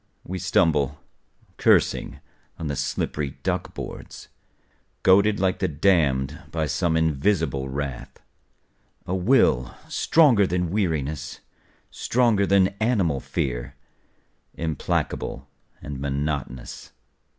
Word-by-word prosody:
We 95 +1 -5
stumble, 75 -5 +2 0.6
cursing, - - +2 0.4
on 80 - -5
the 70 -1 -2
slippery 70 +1 -3
duck - - -2
boards. - - -8 0.7
Goaded 100 +3 +5
like 95 -1 +1
the 95 - +1
damned 75 -5 +1
by 80 -1 -1
some 80 +3 0
invisible 80 -3 0
wrath, 70 -2 -5 0.9
A 90 - -3
will 90 - +2
stronger 130 - +4
than 90 -1 -1
weariness, 75 -7 -2 0.5
stronger 115 -5 +2
than 95 -1 +4
animal 100 - +1
fear, 65 +1 -3 0.8
Implacable 80 -3 -2 0.4
and 70 -2 -6
monotonous. 70 -2 -4
80 Hz, 95 wpm, -24 LUFS, 70-95 Hz, 0.9 s, Goaded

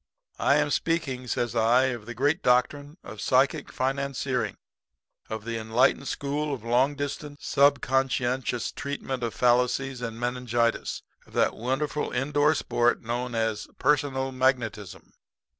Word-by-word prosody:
"'I 140 - +4
am 150 0 +2
speaking,' 140 -8 -1
says 120 0 -1
I, 115 +3 +4
'of 120 -4 -6
the 120 - -6
great 145 - +1
doctrine 145 +5 +1
of 110 - -9
psychic 140 +3 +2
financiering 130 -3 -1 0.7
of 110 -1 -5
the 115 0 -3
enlightened 120 +5 +2
school 145 +2 -2
of 115 - -12
long 125 +5 +2
distance, 145 +1 -5
sub 140 0 +4
conscientious 130 -2 0
treatment 140 -2 -4
of 115 -3 -3
fallacies 125 +2 +2
and 115 -1 -5
meningitis 120 -1 -1 0.2
of - - -19
that - - +2
wonderful 135 +5 -2
in 135 +4 -2
door 145 +2 +3
sport 120 -2 +1
known 120 +1 -3
as 110 -2 -1
personal 135 -3 +1
magnetism.' 125 -7 -1
130 Hz, 140 wpm, -26 LUFS, 120-140 Hz, 0.7 s, I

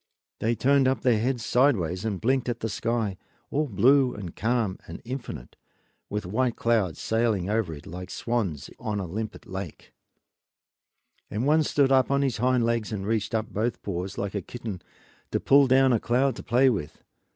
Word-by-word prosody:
They 115 +2 +1
turned 135 +2 +3
up 130 - +1
their 125 -5 +3
heads 120 0 -1
sidewise 100 - +2
and 100 -4 -2
blinked 130 +2 +1
at 120 -1 -3
the 115 - -1
sky, 110 -1 -1 0.3
all 150 +1 0
blue 130 +4 +4
and 95 -5 -7
calm 110 -4 0
and 85 - -8
infinite, 125 - -7 0.5
with 105 -1 -3
white 120 +6 0
clouds 110 -8 +1
sailing 110 -4 0
over 110 -6 0
it 75 -2 -9
like 90 +2 -7
swans 105 -13 -2
on 105 -1 -2
a 95 - -3
limpid 110 +6 -5
lake; 95 -4 -8 1.4
and 110 +5 -2
one 155 +2 +4
stood 140 -3 +2
up 130 -1 +4
on 140 0 +2
his 130 -4 0
hind 125 0 +2
legs 115 -2 0
and 100 -3 -3
reached 110 0 -1
up 110 0 -2
both 115 +3 -2
paws, 95 0 -4
like 100 0 -3
a 100 - -2
kitten, 110 -2 -7 0.5
to - - 0
pull 140 0 +5
down 130 0 +5
a 115 - +3
cloud 125 +3 +1
to - - -6
play 125 +3 +3
with. 95 - -2
115 Hz, 185 wpm, -26 LUFS, 100-130 Hz, 1.4 s, pull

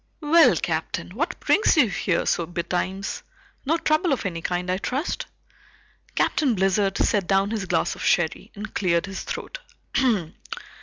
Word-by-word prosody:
"Well, 300 - +6
Captain, 160 +1 -3
what 305 - -3
brings 420 -5 +3
you 275 -6 +6
here 180 -2 0
so 170 - 0
betimes? 180 +3 -3 0.5
No 325 +3 +3
trouble 315 +1 +1
of 255 - -3
any 170 -3 -3
kind, 180 +1 -2
I 185 - -1
trust?" 270 - -3 0.9
Captain 270 -7 +2
Blizzard 195 +1 +1
set 200 -5 +1
down 195 +1 +2
his 215 -4 -2
glass 170 -2 +1
of - - -8
sherry 170 -2 +1
and 210 +1 -7
cleared 170 -4 +1
his 195 0 -6
throat. - - -6
195 Hz, 150 wpm, -24 LUFS, 180-265 Hz, 0.9 s, Well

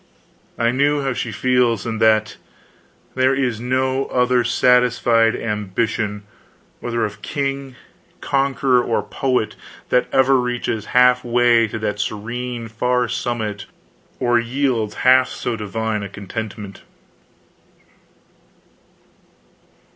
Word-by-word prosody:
I 115 0 +2
knew 140 +2 +1
how 135 -1 -1
she 120 -1 -4
feels, 120 -2 +1
and 110 -1 -4
that 110 -1 +3 0.8
there 130 +1 +2
is 125 -5 -1
no 130 +2 0
other 125 -1 +2
satisfied 120 -1 +3
ambition, 105 0 -2 0.6
whether 115 -1 -1
of 105 - -7
king, 140 -2 -3 0.4
conqueror, 135 -2 +1
or 115 - -1
poet, 130 -5 -1 0.3
that 125 - +2
ever 135 0 +4
reaches 120 -3 -2
half 125 0 +5
way 120 -1 +3
to 110 - -5
that 105 -1 -3
serene 115 +3 -4
far 125 +2 0
summit 110 -4 -3 0.5
or 120 -1 +2
yields 120 -3 -1
half 130 0 +6
so 120 - -3
divine 110 0 -3
a 100 - -6
contentment. 105 0 -7
120 Hz, 110 wpm, -20 LUFS, 110-125 Hz, 0.8 s, half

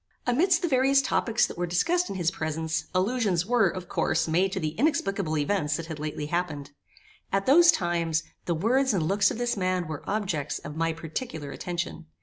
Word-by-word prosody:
Amidst 345 +9 +2
the - - +2
various 270 -1 +4
topics 240 -3 +1
that - - -8
were 175 - 0
discussed 340 - +1
in - - -4
his 175 -2 0
presence, 160 -1 -2
allusions 190 -2 +1
were, 230 -3 +3
of 185 0 -7
course, 160 - 0
made 180 +4 +2
to - - -2
the 155 - -1
inexplicable 195 - 0
events 150 -1 0
that 165 - -5
had 160 -2 -7
lately 150 0 -4
happened. 150 -3 -3 0.6
At 195 0 0
those 340 +5 +7
times, 170 - 0 0.2
the 170 - 0
words 245 +7 +2
and 175 - +1
looks 200 +5 +3
of - - -4
this 240 0 0
man 185 -3 -1
were 155 -2 -5
objects 190 -8 -2
of 150 +1 -8
my 165 +1 0
particular 160 - -6
attention. 175 -1 -5
180 Hz, 190 wpm, -27 LUFS, 160-230 Hz, 0.6 s, those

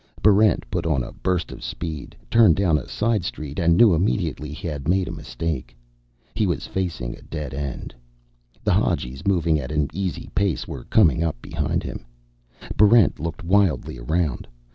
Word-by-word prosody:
Barrent 105 -2 +5
put 85 -2 -1
on 70 -6 +1
a - - -7
burst 90 -2 -2
of - - -9
speed, 75 +4 -6 0.2
turned 110 -8 +6
down 85 -6 +2
a - - -10
side 110 -3 0
street, 75 -5 -5
and 85 -1 +3
knew 110 -4 +7
immediately 80 -4 -1
he 85 +4 -6
had 75 -3 -5
made 90 0 +2
a - - -4
mistake. 80 -7 -5 0.6
He 110 -2 +1
was 85 - -2
facing 85 -11 -3
a - - -16
dead 75 -5 -6
end. 70 -1 -5 0.7
The - - +2
Hadjis, 65 +8 -1
moving 85 -5 +2
at 65 -1 -5
an 75 -2 0
easy 95 0 -4
pace, 100 -4 0
were - - -7
coming - - +4
up 80 -7 -2
behind - - -2
him. - - -6 0.7
Barrent 105 0 +5
looked 80 0 -5
wildly 95 -7 +1
around. 75 +2 -1
85 Hz, 170 wpm, -23 LUFS, 75-95 Hz, 0.7 s, knew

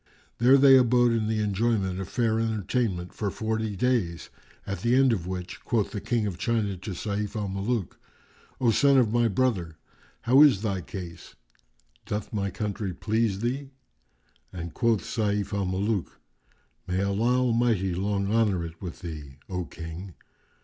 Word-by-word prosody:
There 125 +4 +6
they 135 -1 +8
abode 120 -1 +4
in 115 -2 0
the 110 -1 0
enjoyment 100 -2 0
of 95 - -5
fair 115 -2 +1
entertainment 110 -4 -1
for 105 - -2
forty 110 0 -2
days, 100 -7 -1 0.3
at 100 -1 -4
the 120 +2 +2
end 135 -2 +5
of 90 -5 -3
which 90 -1 -6
quoth 110 -4 0
the 105 - -4
King 110 +1 0
of 95 -4 -4
China 110 -5 0
to 95 +3 -7
Sayf 105 +3 -3
al 105 -2 -2
Muluk, 100 +1 -2 0.6
"O 120 -3 +3
son 140 +4 +4
of 115 -4 +3
my 120 -1 +3
brother, 95 -8 0 0.4
how 130 +4 +5
is 130 -9 +6
thy 100 -4 -1
case[FN#396]? 85 -2 -9 0.7
Doth 105 +2 -4
my 100 -2 -1
country 100 -3 -4
please 105 +1 0
thee?"; 135 +4 -2 0.8
and 85 -2 -6
quoth 115 -4 +1
Sayf 105 -3 -1
al 100 -1 0
Muluk, 95 +1 -2 0.7
"May 95 +1 0
Allah 110 +6 +1
Almighty 115 -6 +1
long 100 +2 -1
honour 105 -7 +2
it 80 0 -10
with 90 -4 -7
thee, 75 -6 -8
O 90 -2 -3
King!" 85 +3 -8
105 Hz, 160 wpm, -27 LUFS, 95-115 Hz, 0.8 s, they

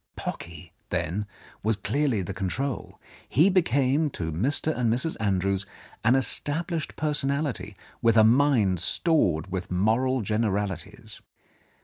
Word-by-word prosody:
Pocky, 85 0 -7 0.2
then, 100 +6 -2 0.3
was 110 +1 +1
clearly 135 -2 0
the 95 - -5
control; 105 +8 -4 0.3
he 160 - +4
became 150 -4 +2
to 80 - -4
Mr. 140 - 0
and 120 -2 +1
Mrs. 130 +8 -1
Andrews 100 -1 0 0.4
an 120 +4 +4
established 155 +6 0
personality 140 -8 -1 0.2
with 115 -1 +3
a 110 - +7
mind 115 - +3
stored 95 - +1
with 95 -1 -4
moral 115 +8 +1
generalities. 105 -4 -3
115 Hz, 115 wpm, -26 LUFS, 95-140 Hz, 0.4 s, a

